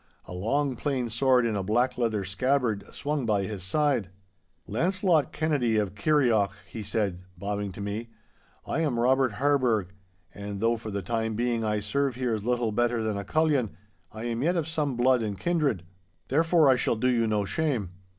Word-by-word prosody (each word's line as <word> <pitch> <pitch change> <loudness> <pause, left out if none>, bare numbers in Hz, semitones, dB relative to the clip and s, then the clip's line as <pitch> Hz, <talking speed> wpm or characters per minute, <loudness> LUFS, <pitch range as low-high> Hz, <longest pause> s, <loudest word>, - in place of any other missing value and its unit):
A - - -9
long, 130 +9 0
plain 130 -2 -2
sword 125 +2 +3
in 115 -2 0
a 100 - 0
black 120 +6 +1
leather 110 -5 0
scabbard 115 +2 0
swung 145 -1 -2
by 105 -3 +2
his 100 -1 -5
side. 120 +1 +1 0.6
'Launcelot 170 - +1
Kennedy 140 -8 +1
of 100 -3 0
Kirrieoch,' 110 -5 +2
he 110 - -7
said, 100 -3 -2 0.2
bowing 100 +1 -3
to 100 - -9
me, 105 +3 -4 0.6
'I - - -2
am 145 -7 0
Robert 130 0 +3
Harburgh, 120 -7 +1 0.4
and 100 +1 -6
though 115 +2 +2
for 110 -1 -7
the 100 -1 -3
time 110 +2 -1
being 120 0 0
I 105 -1 0
serve 135 +5 0
here 125 -2 -1
as 105 -2 -3
little 120 -1 0
better 120 +1 +1
than 110 -1 -1
a 100 - -3
cullion, 135 - +1 0.3
I 110 +1 -7
am 120 0 -2
yet 170 +6 +2
of 165 -3 -1
some 150 -5 -1
blood 125 0 +4
and 105 -3 -3
kindred. 150 - 0 0.5
Therefore 165 +2 +4
I 130 -2 +5
shall - - +1
do 115 +3 0
you 120 -3 +2
no 105 -2 +1
shame. 115 - -1
115 Hz, 185 wpm, -27 LUFS, 105-135 Hz, 0.6 s, I